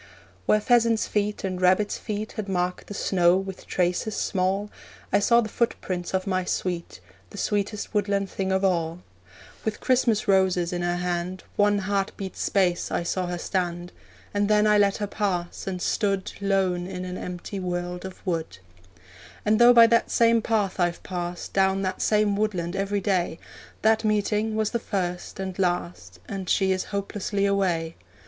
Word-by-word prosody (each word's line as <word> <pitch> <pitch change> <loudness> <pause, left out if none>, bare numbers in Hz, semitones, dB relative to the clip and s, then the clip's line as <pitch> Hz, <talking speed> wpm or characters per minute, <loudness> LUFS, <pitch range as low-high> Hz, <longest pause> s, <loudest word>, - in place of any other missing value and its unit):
Where 215 - +5
pheasants' 230 0 +3
feet 210 0 -1
and 185 -1 -3
rabbits' 185 +3 +3
feet 215 -1 -4
Had 210 -2 -5
marked 180 -1 -1
the 205 - -7
snow 180 -2 +3
with 190 -1 -6
traces 180 +4 0
small, 195 +2 0 0.4
I 200 - +5
saw 235 +3 +4
the 220 - -3
footprints 190 -5 -2
of 185 0 -1
my 185 -2 0
sweet 175 - -3 0.3
The - - -11
sweetest 205 +1 -2
woodland 200 -1 +1
thing 190 0 -3
of 190 +1 +2
all. 170 -2 0 0.6
With 220 -1 -2
Christmas 235 -4 +2
roses 185 -3 +2
in 175 - -2
her 175 0 0
hand, 180 +1 -3
One 205 0 +3
heart 200 0 -1
beat's 190 -2 -6
space 180 -3 +1
I - - 0
saw 180 +1 -1
her 175 0 -3
stand; 175 -1 -2 0.4
And 205 0 +1
then 210 0 +4
I 210 -1 +5
let 200 -1 +3
her 210 - -2
pass, 190 -5 -3
and 185 -1 -2
stood 195 +1 0
Lone 190 -3 +1
in 185 -1 -5
an 180 0 -5
empty 180 +2 -6
world 180 -1 -3
of 190 +1 -9
wood. 165 - -2 0.9
And 215 +1 +3
though 240 +1 +8
by 235 -1 +9
that 230 0 +3
same 230 -1 +4
path 210 -4 0
I've 175 -1 0
passed 175 -1 -5
Down 195 0 +2
that 185 -1 -2
same 210 -1 +2
woodland 190 -4 -1
every 200 +1 -1
day, 180 -4 0 0.5
That 220 +1 +4
meeting 215 +1 +1
was 220 -1 0
the 235 - 0
first 180 -4 -3
and 190 -1 -5
last, 175 - -2
And 190 -2 -5
she 190 -1 +3
is 185 0 0
hopelessly 200 0 -2
away. 180 -5 0
195 Hz, 170 wpm, -25 LUFS, 180-210 Hz, 0.9 s, by